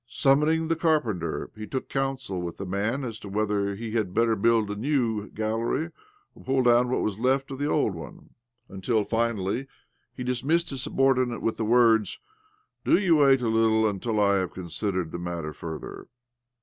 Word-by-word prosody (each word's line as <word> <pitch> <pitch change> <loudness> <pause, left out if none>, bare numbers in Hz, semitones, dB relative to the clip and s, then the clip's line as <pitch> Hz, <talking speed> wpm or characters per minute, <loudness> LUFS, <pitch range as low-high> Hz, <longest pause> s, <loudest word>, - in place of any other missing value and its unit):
Summoning 150 +6 +2
the 165 - +1
carpenter, 125 - 0
he 110 0 -7
took 130 - -4
counsel 130 -8 -2
with 85 -1 -5
the 100 - -5
man 105 +8 -1
as 115 -4 -5
to 100 - -9
whether 100 -1 0
he 115 +2 -6
had 105 -5 -1
better 115 -1 +3
build 110 0 +2
a - - -3
new 115 -3 -1
gallery 115 +9 -2 0.4
or - - -16
pull 130 0 +1
down 120 0 +4
what 130 - 0
was 105 -1 -2
left 135 +3 +1
of 135 - -6
the 145 - 0
old 145 -10 +1
one; 80 -1 -10 0.4
tmtil 105 +3 -1
finally 115 +1 -1 0.5
he 125 - -4
dismissed 135 +8 0
his 135 -2 -4
subordinate 130 -3 +1
with 115 - 0
the 110 - -1
words, 115 -3 +4 0.3
" 425 0 -42
Do - - +4
you 180 -5 +3
wait 135 -3 +5
a - - +1
little 110 0 +3
until 105 +2 -1
I 100 -1 +4
have 95 -1 -2
considered 90 0 -3
the 85 - -5
matter 85 -3 -4
further." 80 +1 -7
115 Hz, 185 wpm, -26 LUFS, 100-135 Hz, 0.5 s, wait